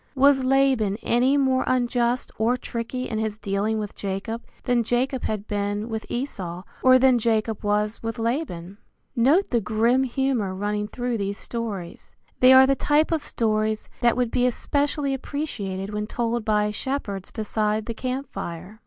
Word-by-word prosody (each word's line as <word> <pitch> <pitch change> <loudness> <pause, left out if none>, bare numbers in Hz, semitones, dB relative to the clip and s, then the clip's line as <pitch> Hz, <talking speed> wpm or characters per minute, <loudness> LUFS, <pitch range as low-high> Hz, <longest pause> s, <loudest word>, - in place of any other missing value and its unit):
Was 270 0 +5
Laban 260 -6 +2
any 255 +4 +3
more 265 -2 +2
unjust 245 -1 +1
or 235 +3 +2
tricky 250 +1 -4
in 220 - -3
his 220 -1 -2
dealing 205 +1 -1
with 210 -2 -4
Jacob 205 +4 -4 0.2
than 245 -2 +2
Jacob 245 +3 -1
had 210 -1 -2
been 205 +1 -2
with 220 -1 -4
Esau, 185 -9 -4 0.2
or 255 0 +7
than 255 -1 +4
Jacob 220 -1 0
was 210 +1 0
with 225 +1 -4
Laban? 225 - -3 0.4
Note 285 +12 +3
the 235 -2 +2
grim 225 +5 +2
humor 255 -6 0
running 210 +1 -2
through 245 0 -3
these 200 0 -2
stories. 210 -7 -6 0.2
They 255 +1 +7
are 260 0 +9
the 275 - +3
type 300 +4 +2
of 320 -2 +1
stories 215 -3 -1
that 240 0 +3
would 245 -2 0
be 250 0 +2
especially 285 +2 0
appreciated 210 -9 -4
when 210 0 -2
told 235 0 -1
by 210 -1 +1
shepherds 210 -5 -4
beside 215 -1 -1
the 230 - -4
camp 255 +4 -3
fire. 180 +6 -7
230 Hz, 160 wpm, -24 LUFS, 210-255 Hz, 0.4 s, are